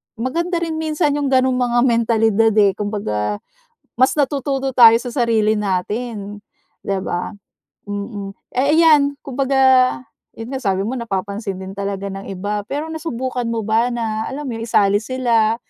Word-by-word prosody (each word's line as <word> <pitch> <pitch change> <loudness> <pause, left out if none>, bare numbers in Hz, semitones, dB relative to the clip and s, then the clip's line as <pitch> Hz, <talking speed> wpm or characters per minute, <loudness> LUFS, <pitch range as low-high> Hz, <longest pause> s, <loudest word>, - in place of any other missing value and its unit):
maganda 330 +10 -2
rin 320 -1 -3
minsan 310 -1 0
'yong 285 - -1
gano'ng 260 -1 +2
mga 240 -1 +1
mentalidad, 225 -2 +2
eh. 205 -2 +5
Kumbaga 105 - -2 0.6
mas 260 - +4
natututo 275 -2 -1
tayo 235 -3 +7
sa 245 - -5
sarili 225 -4 +1
natin, 205 +2 -3 0.5
'di 195 -1 0
ba? 175 +3 -3 0.5
Mm. 200 -1 -5 0.2
Eh, 280 +4 +3
iyan 290 -3 +5
kumbaga 270 0 -1 0.8
'yon 225 +2 -8
nga 265 - -2
sabi 195 -2 0
mo, 230 +5 -3
napapansin 200 -2 -4
din 190 - -7
talaga 200 0 -3
ng 195 0 -7
iba, 205 +2 -3
pero 295 +6 -4
nasubukan 260 -6 -3
mo 230 -1 -2
ba 220 +3 +2
na, 220 -2 -2
alam 290 +2 -6
mo - - -4
'yun, 225 - -5
isali 200 -2 +3
sila 230 -2 +1
230 Hz, 155 wpm, -19 LUFS, 205-265 Hz, 0.8 s, tayo